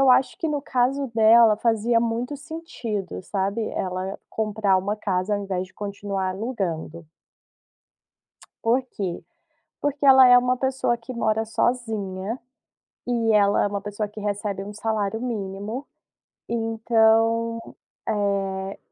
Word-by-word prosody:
eu 270 -1 +6
acho 255 +1 +4
que - - -1
no 295 -1 -1
caso 270 +2 0
dela, 225 0 +6
fazia 230 +1 +2
muito 235 +4 -1
sentido, 270 - -5
sabe, 200 +3 -2
ela 185 +1 -3
comprar 215 -3 +1
uma 200 +3 -1
casa 200 -1 -1
ao 205 - -2
invés 185 -2 -3
de 185 - -24
continuar 200 -2 -3
alugando. 185 -6 -4 1.6
Por 240 +3 +3
quê? 185 -5 -4 0.6
Porque 290 0 -1
ela 265 -1 +9
é 245 0 +8
uma 250 +1 +2
pessoa 260 -2 0
que 235 +2 -9
mora 220 -1 0
sozinha, 220 -2 -2 0.7
e 230 -2 +1
ela 205 -1 +4
é - - +2
uma 200 0 -2
pessoa 205 +1 -4
que 210 +1 -10
recebe 205 -1 -2
1 205 +1 -7
salário 220 0 -2
mínimo, 215 +2 -4 0.6
então, 225 0 +2 0.5
eh, 195 -2 -1
220 Hz, 130 wpm, -24 LUFS, 200-240 Hz, 1.6 s, ela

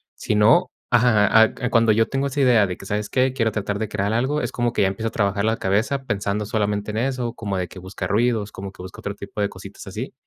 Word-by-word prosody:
Si 105 - -2
no, 105 +3 +5 0.2
ajá, 110 -2 +5
ah, 125 +2 -1
cuando 115 -1 +4
yo 115 +1 +2
tengo 135 +1 0
esa 140 +1 -2
idea 120 -6 +5
de 90 - -4
que: - - -11
"¿Sabes 105 +1 -2
qué?, 130 0 +2
quiero 115 -4 +1
tratar 105 -1 -2
de 110 - -2
crear 100 0 -1
algo", 135 +6 0
es 120 - -3
como 120 -1 -1
que - - 0
ya 95 - +4
empiezo 110 +4 -3
a - - -3
trabajar 100 -1 0
la 110 +1 +2
cabeza 110 +8 0
pensando 105 -1 -2
solamente 105 0 -1
en 105 - -4
eso, 125 -1 -1
como 100 -5 -4
de 90 -1 -2
que 95 - -10
busca 95 0 -6
ruidos, 110 +1 +1
como 95 0 -7
que - - -12
busco 95 - -10
otro 100 - -4
tipo 100 +1 -9
de 100 - +2
cositas 100 +1 -11
así. 110 +7 -6
105 Hz, 255 wpm, -22 LUFS, 100-120 Hz, 0.2 s, no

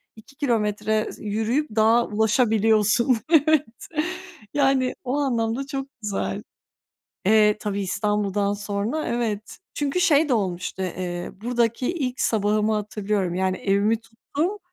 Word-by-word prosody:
2 225 +5 -17
kilometre 215 -4 0
s - - -12
yürüyüp 225 +8 0
dağa 225 +2 +4
ulaşabiliyorsun. 220 +1 +3
Evet, 305 -6 +2 0.7
yani, 270 -3 +2
o 255 +2 -1
anlamda 250 -2 0
çok 270 0 -4
güzel. 210 -2 -3 0.8
Eee, 210 0 +5
tabii 205 -1 -2
İstanbul'dan 205 0 0
sonra 205 +8 -2
evet. 225 -3 -3 0.2
Çünkü 290 +4 -1
şey 305 -3 +4
de 255 - +3
olmuştu, 185 -3 -2
eee, 175 -1 -4
buradaki 240 +3 0
ilk 260 -7 -3
sabahımı 215 0 +2
hatırlıyorum. 210 -3 -1
Yani 185 0 0
evimi 200 +3 +2
tuttum, 285 - -4
220 Hz, 120 wpm, -24 LUFS, 205-255 Hz, 0.8 s, Eee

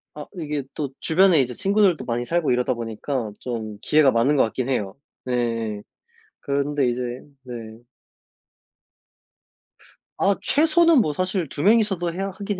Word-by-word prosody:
아. 150 - -7
이게 150 -5 -3
또 145 -3 -3
주변에 175 -2 +4
이제 125 -1 -2
친구들도 195 - +2
많이 120 0 -2
살고 170 +1 0
이러다 125 +1 +1
보니까 115 +1 -4
좀 110 -4 -5
기회가 150 -3 +4
많은 125 +5 +2
것 135 - +4
같긴 125 +3 -2
해요. 105 -6 -2 0.3
네. 115 -4 -2 0.6
그런데 140 -1 0
이제 120 +1 -3 0.4
네. 125 -1 -8 2.6
아. 195 0 +2
최소는 325 0 +4
뭐 155 -9 +1
사실 185 +1 -1
2 145 - -4
명이서도 195 -5 +2
해야 195 +3 -3
하긴 200 0 -5
145 Hz, 265 characters per minute, -23 LUFS, 120-185 Hz, 2.6 s, 주변에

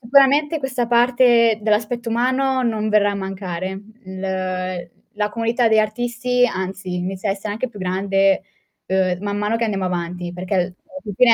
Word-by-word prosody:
sicuramente 280 +5 +4
questa 260 -3 -2
parte 240 -2 +4
dell'aspetto 220 +3 0
umano 260 +3 +1
non 220 -3 0
verrà 210 -1 +4
a - - -4
mancare. 190 -2 -4 0.3
L 185 -2 -4 0.2
la 210 0 0
comunità 230 +2 +1
degli 220 -1 +4
artisti, 245 +3 +1
anzi, 190 -3 -4
inizia 185 +3 -2
a - - +3
essere 195 +2 -6
anche 225 +5 -3
più 210 -4 -11
grande, 195 +1 +2 0.5
ehm, 185 -1 +1
man 205 0 -3
mano 210 +2 0
che 230 - 0
andiamo 200 -4 -1
avanti, 175 0 -3
perché 180 +2 -4
alla 180 -1 +1 0.3
fin 210 - -6
fine 245 0 +6
210 Hz, 165 wpm, -21 LUFS, 190-240 Hz, 0.5 s, fine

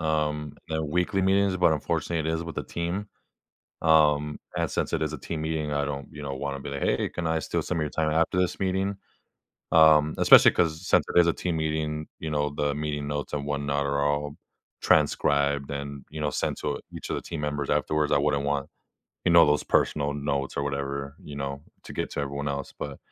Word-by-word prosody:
um, 75 -2 -1
and 80 -1 -2
weekly 90 +4 +1
meetings, 95 0 +3
but, 90 -3 +4
unfortunately, 80 +1 -1
it - - +1
is 80 - -2
with 85 - -7
the - - -1
team. 90 +5 -3 0.7
Um, 75 -2 +3 0.2
and - - 0
since - - -2
it - - 0
is 80 0 -1
a 80 - -4
team 80 +3 -5
meeting, 80 -1 -2
I 70 0 0
don't, 70 -1 -5
you 75 - -9
know, 70 -1 -4
wanna 70 0 -4
be 70 - -7
like, 70 -1 -5
"Hey, - - +1
can 90 - -5
I 80 0 +1
steal - - -2
some 90 - -2
of - - 0
your 75 - -2
time 80 0 0
after 85 +3 +1
this 90 -1 0
meeting?" 95 +1 0 0.7
Um, 80 -2 +6
especially - - +8
'cause 80 +1 0
since - - +4
it - - +8
is 85 - +5
a 85 - +3
team 85 -3 -2
meeting, 75 0 -2
you 80 - -4
know, 75 -1 0
the 75 0 -1
meeting 75 -1 -3
notes 75 0 -3
and 70 -1 -2
whatnot 70 0 -1
are 70 0 0
all 75 0 -1 0.5
transcribed 70 -1 +2
and, 70 -1 -5
you 80 - -7
know, 75 - +1
sent - - -2
to 70 - -2
each - - -8
of - - -1
the - - -3
team 80 -3 -6
members 75 -1 -2
afterwards. 75 -1 +1
I - - +5
wouldn't 70 0 +1
want, 70 -1 -1 0.6
you 90 - +3
know, 85 -2 +8
those 75 0 +2
personal 70 -1 +1
notes 70 -1 -2
or 70 - 0
whatever, 70 0 -3
you 75 -1 -9
know, 70 0 -4 0.2
to - - -9
get - - -3
to - - -3
everyone 70 +1 -3
else, 70 -1 -4
but, 70 -2 -5
75 Hz, 220 wpm, -26 LUFS, 70-80 Hz, 0.7 s, especially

